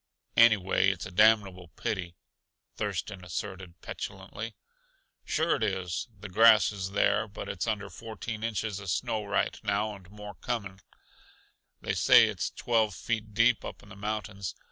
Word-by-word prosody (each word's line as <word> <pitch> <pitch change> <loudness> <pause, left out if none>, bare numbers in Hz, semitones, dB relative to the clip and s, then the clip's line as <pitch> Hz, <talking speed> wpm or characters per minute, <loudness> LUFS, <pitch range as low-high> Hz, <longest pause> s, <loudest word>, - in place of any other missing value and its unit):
"Anyway, 100 -4 +5
it's 95 -2 -3
a - - -8
damnable 95 -2 +4
pity!" 90 -4 -3 0.6
Thurston 100 -4 -3
asserted 90 0 -6
petulantly. - - -6 0.7
"Sure 160 0 +1
it - - -10
is. 95 -2 -1
The 105 - -7
grass 110 +3 +6
is 95 -2 -5
there, 105 - +2
but 100 - -8
it's 95 +3 -3
under 105 -2 -1
fourteen 110 0 -7
inches 110 -2 -2
uh 95 - -9
snow 110 +4 -1
right 100 - 0
now, 105 +1 0
and 95 -3 -13
more 105 0 -9
coming; 100 -6 -4 1.0
they - - -1
say - - +7
it's - - -2
twelve 110 -4 +1
feet 110 0 -3
deep 115 +1 +4
up - - -8
in 105 - -16
the 100 - -11
mountains. 105 -2 -4
105 Hz, 150 wpm, -29 LUFS, 95-110 Hz, 1.0 s, say